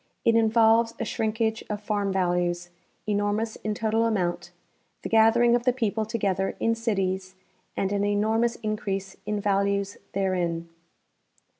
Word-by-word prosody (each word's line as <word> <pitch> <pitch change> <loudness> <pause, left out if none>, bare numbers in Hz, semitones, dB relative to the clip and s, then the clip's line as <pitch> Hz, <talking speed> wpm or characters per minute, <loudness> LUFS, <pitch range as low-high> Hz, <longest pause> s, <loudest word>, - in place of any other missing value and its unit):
It 230 - +5
involves 225 0 +4
a - - -1
shrinkage 220 0 -1
of 210 -1 -2
farm 205 -1 -1
values, 175 -1 0 0.3
enormous 210 +2 0
in 215 -1 -3
total 225 +1 +1
amount, 185 -6 -1 0.5
the - - -4
gathering 225 +2 +5
of 240 0 +2
the 250 - +4
people 220 -3 -1
together 195 -4 -1
in 230 - +2
cities 190 -4 -2 0.4
and 195 - 0
an 200 0 0
enormous 220 +3 +1
increase 195 -2 -3
in 210 -1 -1
values 200 0 0
therein. 175 -4 -1
210 Hz, 135 wpm, -26 LUFS, 195-225 Hz, 0.5 s, It